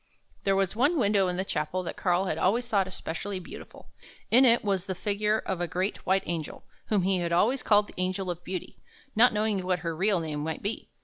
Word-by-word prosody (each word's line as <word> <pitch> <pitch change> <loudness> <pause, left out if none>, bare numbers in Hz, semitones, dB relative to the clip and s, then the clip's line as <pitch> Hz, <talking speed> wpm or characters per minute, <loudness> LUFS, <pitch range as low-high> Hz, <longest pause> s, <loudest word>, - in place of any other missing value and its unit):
There 195 -1 +3
was 195 0 0
one 285 +9 +2
window 205 -6 +3
in 180 0 -2
the 190 - -1
chapel 165 +2 -2
that 170 - -5
Karl 180 0 +1
had - - -2
always 235 +6 +1
thought 200 -5 +1
especially 185 +1 -4
beautiful. 180 - -12 0.4
In 255 +3 +7
it 235 -1 +4
was 195 -3 -1
the 190 - -2
figure 210 +2 0
of 185 -2 -2
a 175 - 0
great 185 +5 -3
white 190 +1 +3
angel, 165 -3 -4 0.2
whom 205 -4 +1
he 185 -1 +1
always 220 +10 +2
called 210 -1 +4
the - - -14
Angel 185 0 -1
of 175 0 -8
Beauty, 185 -1 -6 0.4
not 240 +3 +6
knowing 210 -2 0
what 180 0 +1
her 165 -1 -1
real 195 +2 +2
name 155 -2 -4
might 160 +1 -4
be. 205 +3 -4
190 Hz, 220 wpm, -28 LUFS, 180-210 Hz, 0.4 s, In